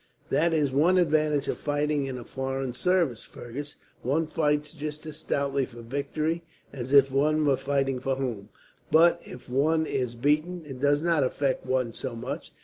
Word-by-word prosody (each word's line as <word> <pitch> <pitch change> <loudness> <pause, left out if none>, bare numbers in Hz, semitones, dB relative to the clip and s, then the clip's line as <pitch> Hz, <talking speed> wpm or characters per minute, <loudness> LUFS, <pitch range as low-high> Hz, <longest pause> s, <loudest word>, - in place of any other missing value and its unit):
"That 170 +2 +3
is 150 -4 +2
one 165 +7 +4
advantage 155 -4 +2
of - - -2
fighting 145 -1 0
in 130 -1 -4
a 120 - -7
foreign 135 0 -3
service, 170 -5 +1
Fergus. 145 +5 -8 0.3
One 150 +6 +1
fights 150 -1 0
just 150 +1 -6
as 155 -1 -7
stoutly 140 -3 0
for 120 -2 -11
victory 145 +6 -2 0.3
as 130 -1 -5
if 140 -1 +6
one 150 +3 +2
were 140 -2 +4
fighting 135 -1 0
for 135 +1 -1
home, 120 -6 -4 0.4
but 170 +2 +5
if 125 - -11
one 155 +5 +2
is 125 -5 -2
beaten 155 +7 0
it 135 -3 -8
does 145 +2 +2
not 165 -4 +3
affect 130 0 -1
one 130 -3 0
so 130 -1 -5
much. 115 - -6
140 Hz, 175 wpm, -27 LUFS, 130-155 Hz, 0.4 s, if